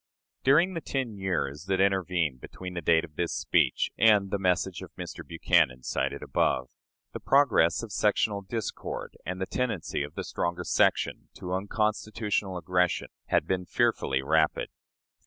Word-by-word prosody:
During 170 +8 +4
the 165 - -4
ten 130 -6 -3
years 90 -6 -2
that 95 0 0
intervened 90 -8 +1
between 90 -1 -8
the 85 - -4
date 80 +1 +3
of 75 - -20
this 85 -1 -1
speech - - +1
and 105 -4 +5
the 100 - 0
message 90 -1 0
of - - -8
Mr. - - -7
Buchanan 65 -5 +2
cited - - -2
above, 65 -1 0 0.4
the - - -5
progress 130 - +3
of 115 - -7
sectional 105 0 +1
discord 110 +3 -5
and 90 +1 -3
the 95 - -1
tendency 110 -10 -2
of 75 +1 -5
the - - -3
stronger 85 0 -2
section - - +1
to 90 0 -5
unconstitutional 105 0 -1
aggression 90 +1 0 0.2
had - - +2
been 90 -1 -2
fearfully 65 -4 +1
rapid. 80 +2 +2
95 Hz, 155 wpm, -28 LUFS, 85-105 Hz, 0.4 s, and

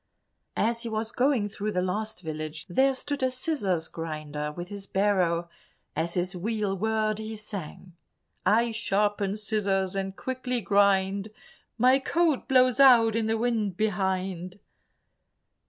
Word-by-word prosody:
As 230 +1 +1
he 235 - -4
was 220 +1 -3
going 250 -5 +2
through 205 +1 -4
the 180 - +1
last 205 +1 -3
village, 155 0 -5
there 265 +8 +2
stood 285 +2 -3
a 260 - +2
scissors 250 - -1
grinder 150 -2 -5
with 175 +4 -7
his 200 -1 -7
barrow; 185 -4 +1 0.5
as 165 +2 -2
his 180 +1 -1
wheel 205 +1 -1
whirred 215 +1 0
he 220 0 -5
sang— 190 -4 -7 0.5
"I 230 +2 +3
sharpen 205 -2 0
scissors 195 -3 0
and 195 0 -3
quickly 255 0 -3
grind, 200 -1 +2 0.5
My 255 +3 +5
coat 320 0 +1
blows 255 -2 +4
out 235 -5 +7
in 225 -1 0
the 225 0 +1
wind 220 -5 -1
behind." 190 -3 -1
205 Hz, 140 wpm, -27 LUFS, 185-230 Hz, 0.5 s, out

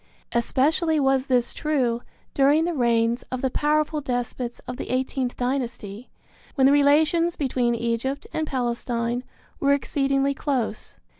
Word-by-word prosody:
Especially 305 +7 +2
was 270 -1 +2
this 250 -2 +1
true 255 -6 0 0.3
during 290 +4 +4
the 345 - -1
reigns 235 -3 +1
of 255 0 -4
the 260 - +1
powerful 300 +2 +1
despots 245 -2 -3
of 250 - -5
the - - -6
eighteenth 255 0 -1
dynasty, 245 -4 -3 0.5
when 265 -3 +3
the 275 - +6
relations 310 +4 +3
between 250 -4 0
Egypt 235 +4 -2
and 315 -1 -1
Palestine 240 -1 -2 0.4
were 280 0 +3
exceedingly 275 0 0
close. 260 -7 -3
265 Hz, 135 wpm, -24 LUFS, 240-285 Hz, 0.5 s, the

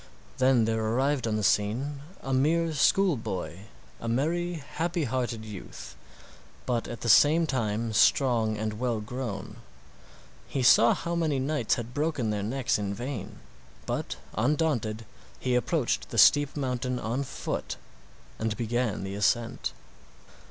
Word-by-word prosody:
Then 130 -3 +4
there 110 0 0
arrived 130 +3 +1
on 110 - 0
the 105 - -1
scene 125 +9 +1 0.2
a 135 - -2
mere 160 +5 +2
school 185 +4 +3
boy—a 85 - -7
merry, 165 +9 0
happy 165 +3 -3
hearted 120 -3 -2
youth, 105 -4 -9 0.7
but 120 -2 -1
at 120 - -7
the - - -3
same 150 +8 +6
time 115 -5 -1
strong 115 -3 +3
and 110 0 -3
well 120 -3 0
grown. 110 -2 -5 0.9
He 135 - -2
saw 120 -1 +6
how 170 - -4
many 160 -4 +1
knights 135 -3 0
had 120 0 -6
broken 145 -6 0
their 105 -1 -1
necks 120 +3 0
in 100 -1 -2
vain, 110 -3 -6 0.4
but - - -3 0.2
undaunted 120 -4 0 0.3
he 125 - -1
approached 125 +2 0
the - - -5
steep 145 0 +5
mountain 125 -2 -1
on 120 +3 -2
foot 135 - -4 0.6
and 110 -1 -1
began 120 -3 -1
the 95 0 -5
ascent. 115 +4 0
120 Hz, 140 wpm, -28 LUFS, 110-140 Hz, 0.9 s, same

